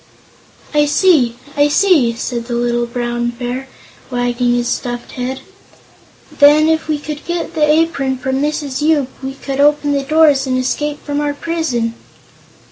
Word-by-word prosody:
"I 295 0 +3
see 290 -7 +3 0.2
I 290 0 +4
see!" 295 -6 +3
said 235 0 -4
the 240 0 -3
little 240 0 0
Brown 240 0 -2
Bear, 245 +2 -5 0.4
wagging 245 -1 0
his 240 0 -1
stuffed 240 0 -4
head. 255 +1 -4 0.9
"Then, 295 +2 +5
if 320 0 +1
we 305 -1 0
could 295 0 -7
get 345 0 -3
the 300 -2 +2
apron 300 -5 +1
from 265 +1 -2
Mrs. 295 -2 -2
Yoop, 300 -4 +2
we 265 0 -5
could 275 0 -5
open 290 0 +3
the 280 -1 +1
doors 290 -1 +3
and 255 0 0
escape 290 +3 -2
from 290 0 -2
our 290 -1 -1
prison." 285 -9 -2
275 Hz, 155 wpm, -16 LUFS, 245-300 Hz, 0.9 s, Then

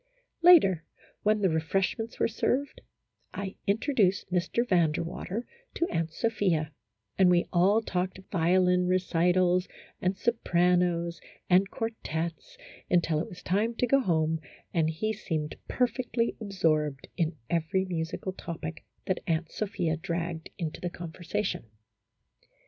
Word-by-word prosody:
Later, 290 - +7 0.4
when 215 0 +2
the 190 - +4
refreshments 195 +8 -1
were - - +2
served, 260 +5 -1 0.5
I 200 -1 -4
in 200 +1 +3
troduced 215 -8 +2
Mr. 185 +7 0
Van 170 -6 +4
der 150 - -2
Water 190 +7 -4 0.3
to 340 - +1
Aunt 165 -1 -1
Sophia, 185 -8 0 0.5
and 185 -1 +7
we 175 -1 +4
all 195 +5 +4
talked 180 -2 -2
violin 180 +1 +3
recitals, 180 0 +2 0.3
and 185 +1 0
sopranos, 175 -6 +1 0.3
and 190 +2 +5
quartets, 220 - -4 0.3
until 170 -3 +2
it 160 - -3
was 180 - -11
time 215 +5 +1
to 250 - +1
go 275 +3 +4
home, 160 -8 +1 0.3
and 160 -2 +2
he 215 +8 -1
seemed 160 -7 -3
per 250 - +2
fectly 240 -2 -1
absorbed 155 -9 0
in 165 -2 0
every 170 +4 0
musical 175 +1 -3
topic 165 -3 -6 0.2
that 185 - 0
Aunt 165 -1 0
Sophia 175 -6 -1
dragged 170 -1 -3
into 165 -3 -4
the 175 - -2
conversation. 175 - -4
180 Hz, 130 wpm, -29 LUFS, 165-205 Hz, 0.5 s, Later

